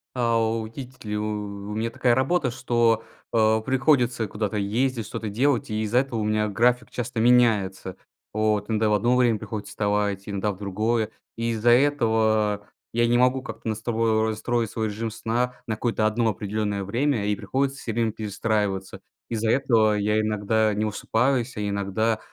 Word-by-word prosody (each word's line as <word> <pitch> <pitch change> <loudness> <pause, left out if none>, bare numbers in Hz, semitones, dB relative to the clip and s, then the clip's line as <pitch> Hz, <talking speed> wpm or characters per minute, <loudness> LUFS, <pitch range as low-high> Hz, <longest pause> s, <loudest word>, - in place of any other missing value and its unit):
А, 115 -2 +2
у 110 0 0
тить 130 +2 -10
ли 105 0 -2
у 105 - -2 0.5
У - - -4
меня 115 +1 -1
такая 120 +1 +2
работа, 130 +1 +1
что, 120 -3 +1 0.3
а, 110 -1 +3
приходится 125 -2 +2
куда-то 105 +1 -3
ездить, 115 +3 0
что-то 110 0 -5
делать, 125 +4 +1
и 110 0 -1
из-за 110 +3 +2
этого 130 -4 -2
у - - -1
меня 105 0 +1
график 120 +4 +2
часто 115 -1 -4
меняется, 110 -6 +3 0.4
вот. 105 -1 0
Иногда 110 -1 +1
в - - +2
одно 120 +4 +2
время 120 -4 +3
приходится 105 -1 -6
вставать, 105 -1 0
иногда 100 0 -1
в 95 - -9
другое. 105 +3 -1 0.3
И 115 0 -1
из-за 115 +1 +1
этого 110 -6 +2 0.3
я 120 +1 +2
не 120 +1 +3
могу 125 +1 +3
как-то 130 - -8
настрои 110 0 0
настроить 115 +1 -1
свой 110 0 -2
режим 110 +2 -4
сна 120 +3 -1
на 110 -3 -2
какое-то 110 -1 0
одно 110 +1 +2
определённое 105 0 -2
время, 115 +2 0
и 105 0 +1
приходится 135 +7 -1
всё 115 - -4
время 115 0 +1
перестраиваться. 105 -2 -2 0.3
Из-за 115 -1 -1
этого 110 -4 +3
я 105 +1 +1
иногда 110 0 +1
не 105 +1 -1
высыпаюсь, 120 +4 0
а 105 - -4
иногда 100 +2 0
110 Hz, 170 wpm, -25 LUFS, 105-120 Hz, 0.5 s, а